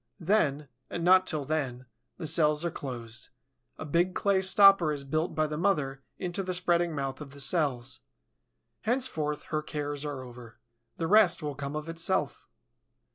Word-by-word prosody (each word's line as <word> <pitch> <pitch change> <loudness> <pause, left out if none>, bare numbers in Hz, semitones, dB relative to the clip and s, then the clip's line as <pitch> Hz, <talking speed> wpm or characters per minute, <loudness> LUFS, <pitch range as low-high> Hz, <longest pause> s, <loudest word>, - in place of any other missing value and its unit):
Then, 155 -6 +1 0.2
and 170 - -4
not 185 +1 +5
till 150 -4 -1
then, 135 -4 -2 0.3
the - - -6
cells 150 0 +2
are 170 - -1
closed; 120 -5 -7 0.5
a - - -6
big 175 +4 +1
clay 200 -1 +2
stopper 190 -3 +6
is 145 -2 -3
built 155 +5 -2
by 155 - +2
the 150 0 -4
mother 150 -8 0 0.2
into 180 +1 -3
the 185 -1 -3
spreading 175 -2 +1
mouth 135 0 -4
of 140 -2 -9
the 140 - -10
cells. 135 -4 0 0.8
Henceforth 215 - -1
her 155 - +1
cares 145 -1 -4
are 145 -3 -5
over. 120 -2 -12 0.4
The 165 - -2
rest 180 -3 +4
will 145 -1 -3
come 140 +1 -5
of 155 +1 -4
itself. 165 +3 -1
155 Hz, 165 wpm, -29 LUFS, 140-175 Hz, 0.8 s, stopper